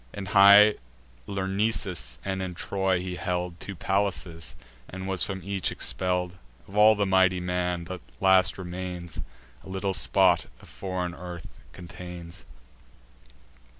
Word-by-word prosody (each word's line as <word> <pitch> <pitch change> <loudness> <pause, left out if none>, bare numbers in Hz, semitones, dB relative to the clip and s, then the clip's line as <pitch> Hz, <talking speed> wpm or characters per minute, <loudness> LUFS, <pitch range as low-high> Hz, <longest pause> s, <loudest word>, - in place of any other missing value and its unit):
In 100 - -6
high 100 +2 +8 0.5
Lyrnessus, 95 - -1
and 95 -1 -2
in 90 -1 -4
Troy, 95 0 0
he 90 0 -5
held 90 -1 -3
Two 100 - -7
palaces, 90 -4 -2 0.3
and 95 +1 -6
was 95 -3 -1
from 95 +4 -2
each 100 -1 -2
expell'd: 90 -1 -1 0.3
Of 100 - -12
all 105 +1 +7
the 100 -1 +1
mighty 95 -1 +3
man, 90 -1 -1
the 90 +1 -6 0.2
last 95 -1 +4
remains 90 -2 -6 0.4
A - - -12
little 95 +1 -2
spot 95 -2 +3
of - - -16
foreign 90 -2 -4
earth 85 -2 -8 0.3
contains. 90 -1 -9
95 Hz, 130 wpm, -27 LUFS, 90-95 Hz, 0.5 s, high